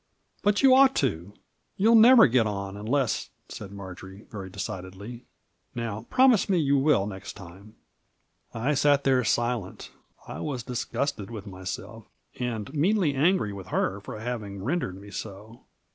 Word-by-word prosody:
"But 205 +4 +2
you 265 -1 +7
ought 270 0 +6
to. 95 - -1 0.5
You'll 220 +4 +4
never 230 +1 +8
get 115 -2 +3
on 100 -1 -4
unless," 115 +4 -1 0.2
said 100 -2 -8
Marjory, 95 0 -10
very 100 -3 -7
decidedly. 95 +6 -7 0.5
"Now, 115 -2 -5
promise 255 -6 +4
me 190 - +3
you 140 -4 +2
will, 135 -8 +3
next 95 -2 -7
time." 95 +4 -13 0.8
I 120 +6 -1
6at 145 0 +3
there 130 -2 +3
silent. 120 -4 -2 0.4
I - - -7
was 130 -6 -4
disgusted 125 -2 -3
with 110 -3 -8
myself, 100 +3 -7 0.3
and 120 0 -4
meanly 170 +1 +2
angry 140 - +2
with 95 -2 -9
her 95 +1 -1
for 105 +2 -8
having 105 -4 -5
rendered 125 - -2
me 100 +1 -12
so. 110 +3 -9
115 Hz, 145 wpm, -26 LUFS, 100-145 Hz, 0.8 s, never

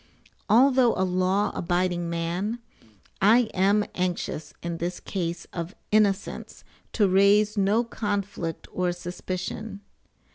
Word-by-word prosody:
[Although 250 +1 +5
a 190 - +1
law 185 +2 +1
abiding 175 0 -1
man,] 170 +7 -2 0.6
I 220 +3 +5
am 200 +3 +3
anxious 175 -4 -3
in 170 -1 -3
this 175 +2 -3
case 170 -3 -4
of 170 +2 -5 0.2
innocence 205 -2 0 0.3
to 210 -3 +3
raise 200 +3 +4
no 205 +3 +2
conflict 205 -7 -4
or 180 -1 0
suspicion. 185 +4 -5
190 Hz, 110 wpm, -26 LUFS, 175-210 Hz, 0.6 s, Although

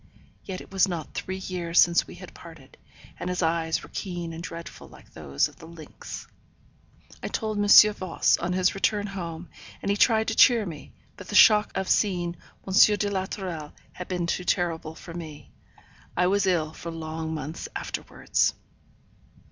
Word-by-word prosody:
Yet 190 -2 -6
it - - -14
was 195 0 +3
not 170 -5 -5
three 190 0 -4
years 180 -2 -4
since 170 0 +5
we - - -11
had - - -12
parted, - - -14 0.4
and - - -4
his 180 0 -1
eyes 160 0 0
were - - -13
keen 175 -3 -5
and 165 - -7
dreadful 170 0 -8
like - - -18
those 70 0 0
of - - -18
the 160 - -12
lynx. 165 -2 -10 1.0
I - - -4
told 215 -2 -2
M. 210 +1 +8
Voss, 185 -4 +1
on 175 +1 -2
his 185 +1 +2
return 205 +1 0
home, 175 -4 -6 0.3
and 200 - -1
he - - +2
tried 220 0 +3
to 225 - -2
cheer 235 -4 +6
me, 160 -5 -9 0.2
but 200 - -11
the 210 - -5
shock 210 0 +7
of 190 0 -2
seeing 175 -4 +1 0.3
M. 190 - -3 0.2
de 205 0 -1
la 190 -1 -1
Tourelle 170 -7 -6 0.2
had 180 - -8
been 180 -2 -2
too 175 +1 -2
terrible 165 -3 -1
for 165 - -10
me. 160 -3 -9 0.7
I 180 - +3
was 195 +1 +2
ill 160 -4 +1
for 170 - -8
long 160 0 -5
months 155 +2 -6
afterwards. - - -1
180 Hz, 180 wpm, -26 LUFS, 165-195 Hz, 1.0 s, M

